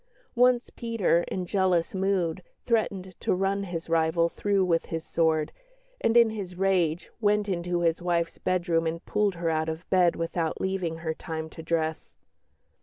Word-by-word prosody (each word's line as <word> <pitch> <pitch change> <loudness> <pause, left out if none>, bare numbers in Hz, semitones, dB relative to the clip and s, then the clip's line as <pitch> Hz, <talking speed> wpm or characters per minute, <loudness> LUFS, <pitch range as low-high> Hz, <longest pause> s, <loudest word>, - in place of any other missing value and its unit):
Once 245 0 +3
Peter, 225 -7 +1
in 185 -1 -3
jealous 180 -2 +1
mood, 190 -3 0 0.2
threatened 200 -5 0
to - - +1
run 195 +1 0
his 170 -3 -5
rival 165 +1 +2
through 200 +1 +1
with 165 -2 +1
his 165 -1 -4
sword, 160 -2 +1 0.5
and, 230 +1 +3
in 230 -2 +6
his 195 -5 -6
rage, 180 -3 +1
"went 210 -1 +2
into 175 -2 -1
his 165 0 +1
wife's 170 -1 -1
bedroom 170 -3 +1
and 165 +1 -4
pulled 210 -2 +1
her 170 -1 -1
out 160 0 0
of 160 +2 -6
bed 180 -2 +4
without 165 -1 -2
leaving 185 -4 -2
her 160 - 0
time 160 -1 -6
to - - -9
dress." 160 -1 -2
175 Hz, 165 wpm, -27 LUFS, 165-195 Hz, 0.5 s, in